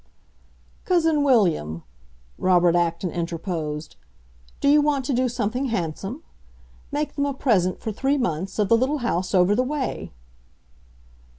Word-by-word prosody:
"Cousin 325 -4 +2
William," 170 - +2 0.6
Robert 175 -2 +4
Acton 170 +1 0
interposed, 165 -3 -4 0.6
"do - - 0
you 295 +1 +6
want 290 -3 0
to 275 - -1
do 250 +1 +1
something 245 +2 -2
handsome? 200 - -3 0.7
Make 295 +1 -2
them 285 -1 0
a 280 - -3
present, 190 -10 +1
for 220 - -3
three 270 +7 0
months, 190 - -2
of 210 -2 +2
the 230 - +5
little 265 +5 +1
house 185 -3 -1
over 185 +2 +4
the 235 - +2
way." 270 0 -3
220 Hz, 135 wpm, -23 LUFS, 175-275 Hz, 0.7 s, you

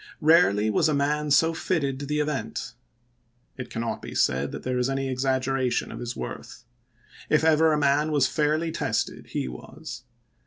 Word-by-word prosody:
Barely 150 - +4
was 155 - +2
a 150 - +1
man 150 +1 0
so 160 +3 +4
fitted 145 -6 -1
to 145 - -5
the 150 +1 -1
event... 150 -2 -3 0.8
It 130 - -7
cannot 115 0 -3
be - - -8
said 65 +2 +1
that - - -7
there 125 0 -1
is 125 +1 +1
any 135 0 -1
exaggeration 130 0 0
of - - -7
his 120 0 -5
worth. 120 - -7 0.7
If 155 - +3
ever 160 0 +4
a 150 - +2
man 145 +1 +2
was 145 -3 +3
fairly 155 +3 0
tested, - - -2
he - - -3
was. 65 0 -9
140 Hz, 170 wpm, -26 LUFS, 130-150 Hz, 0.8 s, Barely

